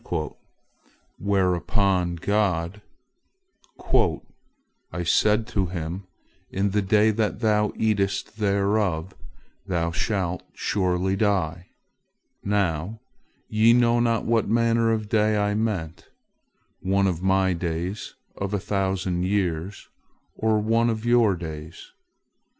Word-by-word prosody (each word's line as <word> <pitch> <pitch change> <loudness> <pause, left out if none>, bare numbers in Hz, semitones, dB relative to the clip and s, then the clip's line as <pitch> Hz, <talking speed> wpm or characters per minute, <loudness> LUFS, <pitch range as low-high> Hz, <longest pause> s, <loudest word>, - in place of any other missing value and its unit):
Whereupon 95 -1 +1
God: 95 0 0 2.1
"I 85 - -3
said 105 +6 +3
to 95 -3 0
him, 85 +2 -5 0.4
'In 100 +1 0
the 105 +1 +1
day 105 +2 +3
that 110 +1 -1
thou 105 -2 +2
eatest 100 -1 -1
thereof, 100 -3 0 0.5
thou 85 -3 0
shalt 90 -1 -1
surely 95 -1 0
die!' 90 -5 0 0.8
Now, 100 0 -1 0.5
ye 110 +2 +4
know 120 -1 +4
not 115 -1 +1
what 115 -1 +1
manner 115 0 +2
of 110 -1 -1
day 105 0 +2
I 105 0 +1
meant—one 100 -1 -4
of 90 -3 -1
My 95 0 +2
days 85 +3 -4 0.2
of 100 +1 -3
a - - 0
thousand 95 -2 -1
years, 95 -1 -2 0.5
or 110 -1 +1
one 115 +2 +2
of 110 0 -3
your 120 -5 +4
days. 80 -1 -8
100 Hz, 105 wpm, -24 LUFS, 90-110 Hz, 2.1 s, ye